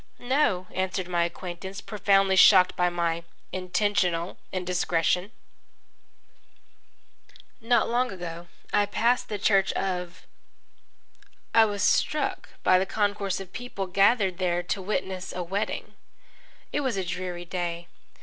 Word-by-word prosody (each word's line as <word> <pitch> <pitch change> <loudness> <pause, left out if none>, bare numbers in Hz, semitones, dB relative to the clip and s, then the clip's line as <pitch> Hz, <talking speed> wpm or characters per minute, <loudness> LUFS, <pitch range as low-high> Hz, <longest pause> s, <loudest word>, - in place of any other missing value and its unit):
"No," 245 -8 +1
answered 185 -1 -2
my 175 -1 +1
acquaintance, 180 +2 -6
profoundly 195 -2 +2
shocked 185 -1 +7
by 180 0 +2
my 170 -1 -1 0.3
intentional 185 -2 0
indiscretion. 180 +1 0 2.3
Not 235 0 +3
long 245 +1 +1
ago 175 -2 -7 0.3
I 205 - +3
passed 235 +4 +1
the 210 - -2
Church 195 -1 +3
of. 180 -1 -3 1.3
I 225 -1 +7
was 205 -1 -2
struck 300 +6 +1
by 185 - +5
the 190 - -1
concourse 205 -2 -1
of 190 -1 -10
people 245 -5 -5
gathered 195 0 +2
there 175 -1 0
to 190 +2 -3
witness 190 -1 -3
a 180 - -3
wedding. 195 +5 -3 0.8
It - - +1
was 260 -7 -1
a 190 - -1
dreary 175 0 -4
day. 175 -1 -4
190 Hz, 120 wpm, -26 LUFS, 180-205 Hz, 2.3 s, shocked